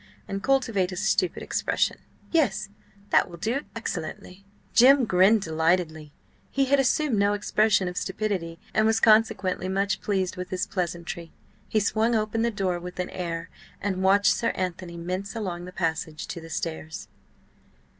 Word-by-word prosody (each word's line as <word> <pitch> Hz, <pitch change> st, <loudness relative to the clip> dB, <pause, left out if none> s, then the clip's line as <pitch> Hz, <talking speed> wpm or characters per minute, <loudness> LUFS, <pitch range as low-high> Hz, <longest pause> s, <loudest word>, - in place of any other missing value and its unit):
And 195 Hz, 0 st, -4 dB
cultivate 230 Hz, -7 st, +1 dB
a -, -, -5 dB
stupid 180 Hz, 0 st, 0 dB
expression. -, -, 0 dB, 0.3 s
Yes, 210 Hz, -, +1 dB, 0.4 s
that -, -, +4 dB
will 170 Hz, -, -9 dB
do 230 Hz, -, -1 dB
excellently." 185 Hz, -2 st, -6 dB, 0.3 s
Jim 265 Hz, +2 st, +7 dB
grinned 195 Hz, +2 st, +4 dB
delightedly; 160 Hz, -1 st, 0 dB, 0.4 s
he 275 Hz, 0 st, +1 dB
had 280 Hz, +1 st, +3 dB
assumed 270 Hz, -3 st, +2 dB
no 200 Hz, +1 st, +3 dB
expression 205 Hz, -1 st, +2 dB
of 180 Hz, -, -4 dB
stupidity, 185 Hz, -6 st, -2 dB, 0.2 s
and 215 Hz, 0 st, +3 dB
was 220 Hz, 0 st, +3 dB
consequently 215 Hz, -4 st, +3 dB
much 195 Hz, +1 st, 0 dB
pleased 190 Hz, -3 st, -1 dB
with 180 Hz, 0 st, -5 dB
this 185 Hz, +3 st, -1 dB
pleasantry. 170 Hz, -3 st, -4 dB, 0.4 s
He 215 Hz, -, +2 dB
swung 220 Hz, +3 st, +1 dB
open 215 Hz, +1 st, 0 dB
the 235 Hz, -, +2 dB
door 190 Hz, -5 st, -1 dB
with 180 Hz, +1 st, -9 dB
an 180 Hz, -, -2 dB
air, 170 Hz, -2 st, -4 dB, 0.3 s
and 190 Hz, -2 st, -2 dB
watched 195 Hz, +2 st, +5 dB
"Sir 230 Hz, -, 0 dB
Anthony" 180 Hz, -1 st, -4 dB
mince 185 Hz, +5 st, -4 dB
along 180 Hz, -6 st, -4 dB
the 180 Hz, -, -8 dB
passage 160 Hz, -3 st, -2 dB
to 170 Hz, -, -5 dB
the 165 Hz, -, -11 dB
stairs. 160 Hz, 0 st, -5 dB
190 Hz, 155 wpm, -26 LUFS, 175-215 Hz, 0.4 s, Jim